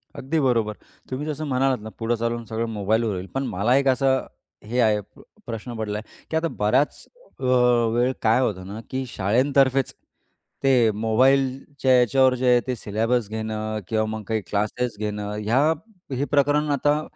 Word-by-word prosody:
अगदी 155 Hz, +5 st, -1 dB
बरोबर, 115 Hz, -6 st, +1 dB, 0.4 s
तुम्ही 130 Hz, +3 st, -3 dB
जसं 155 Hz, 0 st, -3 dB
म्हणालात 130 Hz, -1 st, +1 dB
ना, 110 Hz, -, -7 dB
पुढे 115 Hz, +1 st, 0 dB
चालून 115 Hz, +1 st, -2 dB
सगळं 115 Hz, 0 st, -2 dB
मोबाईलवर 110 Hz, +2 st, 0 dB
होईल. 90 Hz, 0 st, -5 dB
पण 135 Hz, -, -1 dB
मला 105 Hz, +7 st, +1 dB
एक 140 Hz, 0 st, +1 dB
असा 130 Hz, 0 st, +3 dB, 0.5 s
हे 115 Hz, +4 st, -2 dB
आहे 110 Hz, -3 st, +4 dB, 0.2 s
प -, -, -15 dB, 0.2 s
प्रश्न 115 Hz, +1 st, -6 dB
पडला 105 Hz, -1 st, -3 dB
आहे, 105 Hz, -, -12 dB
की -, -, -3 dB
आता 165 Hz, +1 st, 0 dB
बराच 125 Hz, +8 st, +1 dB, 0.3 s
अ, -, -, -9 dB, 0.5 s
वेळ 120 Hz, +2 st, +2 dB
काय 110 Hz, +2 st, +3 dB
होतं 95 Hz, -7 st, -2 dB
ना 105 Hz, +3 st, -7 dB
की 130 Hz, 0 st, -3 dB
शाळेतर्फेच 130 Hz, +5 st, +2 dB, 0.7 s
ते 125 Hz, -5 st, +4 dB
मोबाईलच्या 130 Hz, +5 st, +1 dB
याच्यावर 130 Hz, +2 st, +4 dB
जे 130 Hz, 0 st, -1 dB
आहे, 125 Hz, 0 st, +6 dB
ते 130 Hz, -, -1 dB
सिलॅबस 115 Hz, +1 st, -1 dB
घेणं 110 Hz, 0 st, -3 dB
किंवा 110 Hz, -1 st, +1 dB
मग 110 Hz, 0 st, -5 dB
काही 110 Hz, -1 st, 0 dB
क्लासेस 105 Hz, +3 st, -1 dB
घेणं, 105 Hz, -1 st, -3 dB
ह्या 115 Hz, +6 st, +2 dB, 0.5 s
हे 135 Hz, +3 st, 0 dB
प्रकरण 145 Hz, +1 st, +2 dB
आता 145 Hz, +2 st, +2 dB
120 Hz, 170 wpm, -24 LUFS, 110-135 Hz, 0.7 s, आहे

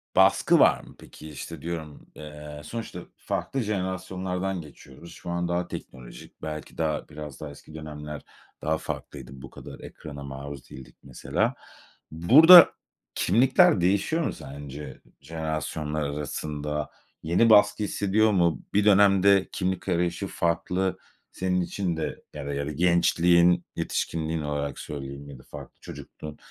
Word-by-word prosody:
baskı -, -, +5 dB
var -, -, +5 dB
mı -, -, -15 dB
peki? 80 Hz, -, -12 dB
İşte, 75 Hz, +2 st, -8 dB
diyorum, 80 Hz, -3 st, -6 dB
eee, 75 Hz, -1 st, -9 dB
sonuçta 115 Hz, +8 st, -6 dB, 0.2 s
farklı 135 Hz, -, -3 dB
jenerasyonlardan 95 Hz, -2 st, -3 dB
geçiyoruz. 75 Hz, +2 st, -14 dB
Şu -, -, -9 dB
an 85 Hz, 0 st, -1 dB
daha 85 Hz, 0 st, -1 dB
teknolojik 60 Hz, -2 st, -10 dB
belki 75 Hz, -1 st, -7 dB
daha 80 Hz, -2 st, -2 dB
biraz 75 Hz, -2 st, -9 dB
daha 75 Hz, -, -5 dB
eski 70 Hz, +2 st, -14 dB
dönemler 75 Hz, -1 st, -7 dB, 0.4 s
daha 80 Hz, +1 st, 0 dB
farklıydı. 65 Hz, -4 st, -7 dB
Bu -, -, -9 dB
kadar -, -, -11 dB
ekrana 70 Hz, -2 st, -9 dB
maruz 70 Hz, 0 st, -8 dB
değildik 65 Hz, -2 st, -12 dB
mesela. -, -, -1 dB, 0.6 s
Burada 155 Hz, -, +9 dB, 0.5 s
kimlikler 120 Hz, -5 st, +4 dB
değişiyor 100 Hz, -, +1 dB
mu -, -, -1 dB
sence 70 Hz, -1 st, -9 dB, 0.2 s
jenerasyonlar 75 Hz, 0 st, -3 dB
arasında? 75 Hz, +1 st, -4 dB, 0.3 s
Yeni 90 Hz, +8 st, +3 dB
baskı 105 Hz, 0 st, +5 dB
hissediyor 105 Hz, +2 st, +2 dB
mu? 85 Hz, -7 st, +2 dB
Bir 105 Hz, +1 st, +3 dB
dönemde 100 Hz, -1 st, +5 dB
kimlik 95 Hz, 0 st, -2 dB
arayışı 90 Hz, +2 st, 0 dB
farklı 90 Hz, +2 st, -1 dB, 0.3 s
senin 90 Hz, 0 st, 0 dB
için 90 Hz, -1 st, -2 dB
de 80 Hz, -, -4 dB
ya -, -, -7 dB
da 70 Hz, -, -3 dB
ya 70 Hz, 0 st, -2 dB
gençliğin, 85 Hz, +2 st, +3 dB
yetişkinliğin 80 Hz, 0 st, -2 dB
olarak 75 Hz, -2 st, -3 dB
söyleyeyim 70 Hz, 0 st, -7 dB
ya 70 Hz, -2 st, -10 dB
da -, -, -16 dB
farklı -, -, -11 dB
çocukluğun. 75 Hz, -1 st, -10 dB
80 Hz, 135 wpm, -26 LUFS, 75-95 Hz, 0.6 s, Burada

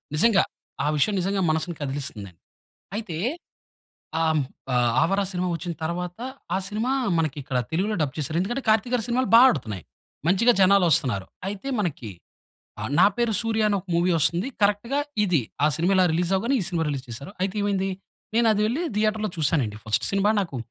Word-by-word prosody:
నిజంగా, 220 Hz, +7 st, +4 dB, 0.4 s
ఆ -, -, +1 dB
విషయం 200 Hz, +8 st, +2 dB
నిజంగా 195 Hz, +2 st, 0 dB
మనసుని 160 Hz, +2 st, -1 dB
కదిలిస్తుంది. 135 Hz, -9 st, -4 dB, 0.7 s
అయితే 210 Hz, -7 st, -5 dB, 1.0 s
ఆహ్, 160 Hz, -1 st, +2 dB, 0.3 s
ఆ -, -, +1 dB, 0.3 s
'ఆవరా' 195 Hz, +3 st, +1 dB
సినిమా 180 Hz, 0 st, -1 dB
వచ్చిన 170 Hz, +2 st, -4 dB
తర్వాత, 175 Hz, +3 st, -4 dB, 0.4 s
ఆ -, -, +2 dB
సినిమా 220 Hz, +5 st, -2 dB, 0.3 s
మనకి 155 Hz, -2 st, -1 dB
ఇక్కడ 130 Hz, -1 st, -2 dB
తెలుగులో 195 Hz, +6 st, 0 dB
డబ్ 145 Hz, -2 st, -1 dB
చేసారు. 150 Hz, +2 st, -2 dB
ఎందుకంటే 240 Hz, +8 st, -2 dB
'కార్తీక్' 220 Hz, +3 st, +2 dB
గారి 235 Hz, -3 st, 0 dB
సినిమాలు 255 Hz, +2 st, +1 dB
బా 230 Hz, -, +10 dB
ఆడుతున్నాయి. 105 Hz, -, -4 dB, 0.4 s
మంచిగా 215 Hz, +7 st, +5 dB
జనాలు 195 Hz, 0 st, +5 dB
వస్తున్నారు. 125 Hz, -, +2 dB, 0.2 s
అయితే 205 Hz, +7 st, -6 dB
మనకి 145 Hz, -, -3 dB, 0.7 s
ఆహ్, 110 Hz, +3 st, -4 dB
'నా 185 Hz, -, +8 dB
పేరు 235 Hz, -2 st, +1 dB
సూర్య' 225 Hz, -1 st, +1 dB
అనే 205 Hz, -, +1 dB
ఒక 190 Hz, -, -24 dB
మూవీ 175 Hz, +1 st, +2 dB
వస్తుంది. 170 Hz, -, +2 dB
కరెక్ట్‌గా 210 Hz, +7 st, +1 dB, 0.2 s
ఇది 180 Hz, -7 st, +2 dB, 0.2 s
ఆ 150 Hz, -, +5 dB
సినిమా 170 Hz, +4 st, +1 dB
ఇలా 185 Hz, -, +5 dB
రిలీజ్ 175 Hz, +2 st, 0 dB
అవ్వగానే 235 Hz, +8 st, 0 dB
ఈ -, -, -1 dB
సినిమా 170 Hz, -3 st, -1 dB
రిలీజ్ 135 Hz, -2 st, -4 dB
చేశారు. 140 Hz, -, -8 dB
అయితే 190 Hz, +2 st, -1 dB
ఏమైంది, 195 Hz, -1 st, 0 dB, 0.5 s
నేను 235 Hz, 0 st, +4 dB
అది 210 Hz, -, 0 dB
వెళ్లి 255 Hz, +10 st, -1 dB
థియేటర్‌లో 215 Hz, 0 st, 0 dB
చూసానండి 140 Hz, -9 st, +1 dB
ఫస్ట్ 110 Hz, 0 st, 0 dB
సినిమా 200 Hz, +2 st, +3 dB
నాకు. 170 Hz, -9 st, -4 dB
185 Hz, 175 wpm, -24 LUFS, 155-215 Hz, 1.0 s, బా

